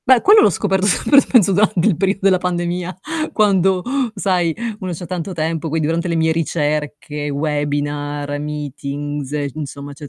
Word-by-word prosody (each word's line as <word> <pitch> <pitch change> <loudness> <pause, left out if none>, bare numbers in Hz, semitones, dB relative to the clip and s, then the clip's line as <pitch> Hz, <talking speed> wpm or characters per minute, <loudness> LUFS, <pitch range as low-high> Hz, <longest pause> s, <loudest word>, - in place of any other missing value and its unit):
Beh, 255 -2 +6
quello 420 +2 +7
l'ho - - +5
scoperto, 190 +1 0
sempre 280 +8 +4
penso 220 -9 +3
durante 200 -2 +2
il 205 - +3
periodo 195 +4 0
della 190 -2 +4
pandemia, 175 0 -2 0.3
quando, 190 -3 +2 0.3
sai, 180 -5 +1 0.3
uno 185 -3 -4
c'ha 175 +2 -7
tanto 180 +2 -4
tempo, 160 0 -2
quindi 160 0 0
durante 165 +3 -1
le 170 - -1
mie 160 0 +2
ricerche, 150 -2 -2
webinar, 145 0 -2
meetings, 145 -1 -5
e 145 -2 -2
insomma, 145 -1 -7
cioè 145 +1 -10
165 Hz, 160 wpm, -19 LUFS, 145-185 Hz, 0.3 s, quello